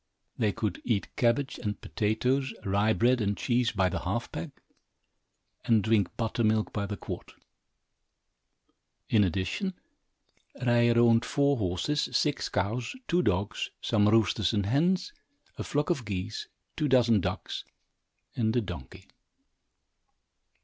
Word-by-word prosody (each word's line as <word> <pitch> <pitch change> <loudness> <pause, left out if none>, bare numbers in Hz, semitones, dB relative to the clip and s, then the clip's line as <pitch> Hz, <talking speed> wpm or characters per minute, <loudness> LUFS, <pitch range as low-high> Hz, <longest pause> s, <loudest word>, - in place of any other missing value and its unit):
They 105 -2 +1
could 100 -3 -3
eat 110 -5 -1
cabbage 130 +4 +1
and 105 -2 -3
potatoes, 125 +4 0
rye 100 +3 +2
bread 120 +2 +3
and 100 -1 0
cheese, 120 -1 +1
by 95 -3 +2
the 90 - -2
half - - -3
peck, - - -5 1.1
and 110 -3 +3
drink 105 -4 +1
buttermilk 110 -1 0
by 100 -1 -2
the 100 0 -4
quart. - - -7 1.8
In 105 -2 +5
addition, 100 - -1 0.8
Ryer 120 -1 +3
owned 115 0 +5
four 140 +1 +2
horses, 100 +9 -1
six 145 -3 +1
cows, 110 - -2
two 175 +1 +2
dogs, 105 - -1
some 105 -2 +2
roosters 110 -3 +3
and 100 -2 +1
hens, 175 - +1 0.5
a - - -2
flock 145 +3 0
of 140 -8 -1
geese, 105 0 -4 0.3
two 150 - 0
dozen 120 -5 +4
ducks, - - -4 0.7
and 110 -1 +1
a 120 - +3
donkey. 90 - -8
115 Hz, 130 wpm, -29 LUFS, 105-125 Hz, 1.8 s, In